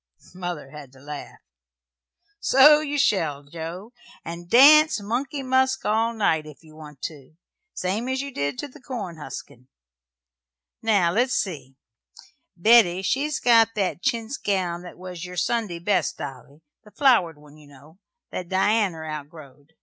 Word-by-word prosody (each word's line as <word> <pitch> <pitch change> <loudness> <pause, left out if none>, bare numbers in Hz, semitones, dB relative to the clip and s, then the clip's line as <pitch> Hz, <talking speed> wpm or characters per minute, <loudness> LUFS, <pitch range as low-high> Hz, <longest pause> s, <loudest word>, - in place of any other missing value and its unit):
Mother 175 -6 -6
had 145 -4 -11
to 135 - -17
laugh. 145 +1 -9 1.0
"So 295 0 +6
you 295 -1 -3
shall, 160 - +1
Joe, 170 - -8 0.3
and 170 +1 -8
dance 305 - +7
'Money 265 +7 -3
Musk' 260 0 +1
all 225 +2 +1
night, 160 -8 0
if 150 +2 -14
you 155 -1 -17
want 150 -3 -13
to 150 -1 -8 0.4
same 205 +7 -2
as 260 0 -1
you 280 +1 -4
did 140 - -3
to - - -5
the 285 +1 -17
corn 210 -10 -6
huskin'. 130 -3 -10 1.1
Now, 200 -6 +2
let's 245 +6 +1
see. 140 -9 -4 0.8
Betty, 190 -2 +5
she's 285 +7 -1
got 225 -2 +4
that 195 -4 -1
chintz 235 0 -2
gown 180 -4 -2
that 180 - -11
was 180 -1 -8
your 180 0 -8
Sunday 195 -1 -1
best, 180 -1 0
Dolly 140 +2 -9 0.2
the 210 - -16
flowered 210 - +2
one, 150 0 -17
you 150 -1 -17
know, 145 +5 -18 0.3
that 180 -2 -6
Dianner 190 -4 +1
outgrowed. 150 -1 -10
180 Hz, 150 wpm, -24 LUFS, 155-235 Hz, 1.1 s, dance